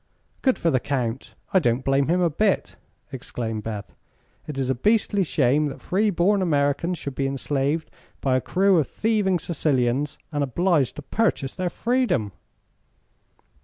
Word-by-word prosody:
"Good 260 -2 +2
for 165 - +1
the 130 - +2
Count! 125 -2 -3 0.2
I 190 - +6
don't 125 -4 0
blame 135 0 +2
him 175 +3 +2
a 175 - +3
bit," 200 +6 0 0.4
exclaimed 115 -4 -4
Beth. 105 -2 -6 0.5
"It 150 -3 -6
is 130 -1 0
a - - +3
beastly 205 - +2
shame 150 -2 +2
that 140 - -7
free 205 +4 +1
born 195 +2 +2
Americans 160 +1 +1
should 140 -2 -5
be 135 +1 -1
enslaved 140 +3 -1 0.3
by 130 -2 +1
a 130 - +2
crew 190 +3 +3
of 150 - 0
thieving 210 -4 +1
Sicilians, 140 -4 0
and 145 -2 0
obliged 150 0 +1
to 150 - -8
purchase 140 -9 0
their 185 -1 -2
freedom!" 235 - 0
145 Hz, 160 wpm, -24 LUFS, 130-185 Hz, 0.5 s, I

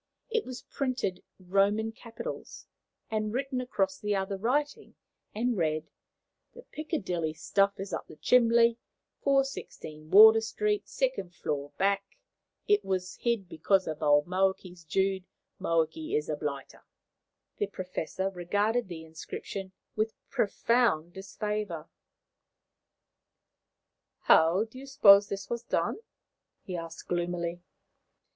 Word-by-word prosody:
It 455 - 0
was 255 -1 -7
in - - -47
printed 250 -9 -2
Roman 200 +4 +1
capitals, 230 0 -8 0.5
written 250 +5 -1
across 195 -7 -1
the 210 -1 0
other 195 0 -1
writing, 270 +9 -1 0.4
and 240 +2 0
read: 155 -3 -1 0.6
"THE 485 - -11
PICKERDILLEY 185 - -3
STUF 195 +4 +1
IS 195 0 -5
UP - - -4
THE 160 - -12
CHIMBLY 235 +2 +4 0.4
416 270 - -1
WARDOUR 220 +3 +9
ST 415 - -1
2ND - - -2
FLOUR 145 -1 -3
BACK 200 0 +2 0.6
IT 415 0 +4
WAS 185 -1 -2
HID 235 -6 -1
BECOS 185 +4 +1
OF 155 -1 -5
OLD 145 -1 +4
MOAKEYS 185 -1 -1
JOOD 190 +3 0 0.4
MOAKEY 190 - 0
IS 445 - -1
A - - 0
BLITER." - - -5 0.8
The 205 - +1
Professor 185 0 -4
regarded 205 +6 0
the 165 -3 -7
inscription 185 +4 -7 0.2
with 215 +1 -1 0.2
profound 205 -6 +1
disfavour. 195 -3 -4 2.3
"How 165 +6 +5
do 225 +3 -11
you 275 - -10
suppose 205 -7 +7
this 195 -1 -4
was 235 -1 -3
done?" 240 - -1 0.6
he 185 - -5
asked 165 -1 -7
gloomily. 175 0 -2
200 Hz, 120 wpm, -29 LUFS, 175-235 Hz, 2.3 s, WARDOUR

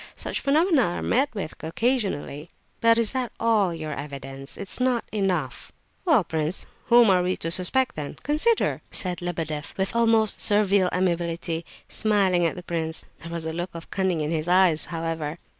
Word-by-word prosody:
Such - - -4
phenomena 310 +2 +3
are 175 -6 -1
met 275 +4 +2
with 190 -6 -4
occasionally!" 170 - -1 0.3
"But 230 0 +4
is 230 -2 +1
that 255 -3 -2
all 215 -5 +2
your 155 -2 -5
evidence? 135 -1 -7
It 200 - -6
is - - +2
not 250 -2 +1
enough!" 180 - -2 0.3
"Well, 310 - +4
prince, 160 +1 -2 0.2
whom 235 -3 +6
are 180 -1 +4
we 180 +1 -1
to 165 - -3
suspect, 220 +9 +3
then? 150 -2 -6
Consider!" 305 - +1
said 180 -2 -1
Lebedeff 160 -4 -4
with 190 +3 -1
almost 225 -2 +3
servile 200 -3 +3
amiability, 170 -2 -1 0.2
smiling 195 -5 +2
at - - -3
the 180 - -8
prince. 160 -2 -3
There 165 - -9
was 170 -1 -4
a 160 - -3
look 175 +2 -3
of 165 - -9
cunning 185 -4 0
in 150 +1 -2
his 160 0 -1
eyes, 180 -3 +4
however. 165 -2 -4
180 Hz, 175 wpm, -25 LUFS, 160-220 Hz, 0.3 s, whom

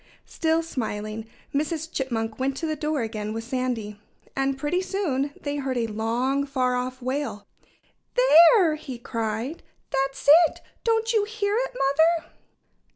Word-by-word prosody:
Still 325 0 0
smiling, 220 -6 -4 0.3
Mrs. 315 +2 -2
Chipmunk 225 -4 -2
went 270 +1 -1
to 330 - -3
the 310 -1 -1
door 300 -3 -1
again 215 -1 -4
with 225 0 -4
Sandy. 230 -4 -3 0.3
And 270 0 0
pretty 295 +6 0
soon 300 -9 -1
they 285 0 -3
heard 265 -2 -2
a 235 - +1
long, 230 +6 0
far 255 -2 +1
off 255 0 -3
wail. 255 -6 -3 0.7
"There!" 345 -7 +7
he 265 -5 -7
cried. 230 +4 -3 0.3
"That's 270 0 -1 0.2
it! - - -14 0.2
Don't 455 0 +1
you 425 -2 +3
hear 415 -1 -1
it, - - -1
Mother?" 320 - +2
270 Hz, 145 wpm, -25 LUFS, 235-325 Hz, 0.7 s, There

